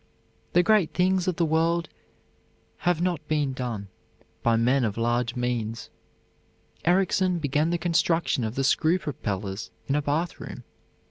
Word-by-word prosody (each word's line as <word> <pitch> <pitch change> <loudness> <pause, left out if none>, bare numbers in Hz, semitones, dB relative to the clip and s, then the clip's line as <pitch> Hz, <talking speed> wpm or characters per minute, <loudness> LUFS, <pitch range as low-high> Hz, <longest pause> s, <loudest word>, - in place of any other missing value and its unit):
The 175 - +5
great 210 -3 +3
things 185 0 +2
of 185 - +1
the 170 - +1
world 165 +1 +1 0.9
have 175 -1 +1
not 170 -4 -1
been 150 -3 0
done 120 -6 -4 0.5
by 115 -1 +3
men 125 +4 +3
of 110 -2 -1
large 120 +1 0
means. 120 -2 -3 0.9
Ericsson 185 +1 +2
began 150 0 +1
the 175 - +1
construction 165 -5 +1
of 110 +1 -3
the 135 - 0
screw 160 +5 +3
propellers 105 - -4 0.2
in 140 - -1
a 150 - +2
bathroom. 155 +4 -3
150 Hz, 140 wpm, -26 LUFS, 120-175 Hz, 0.9 s, The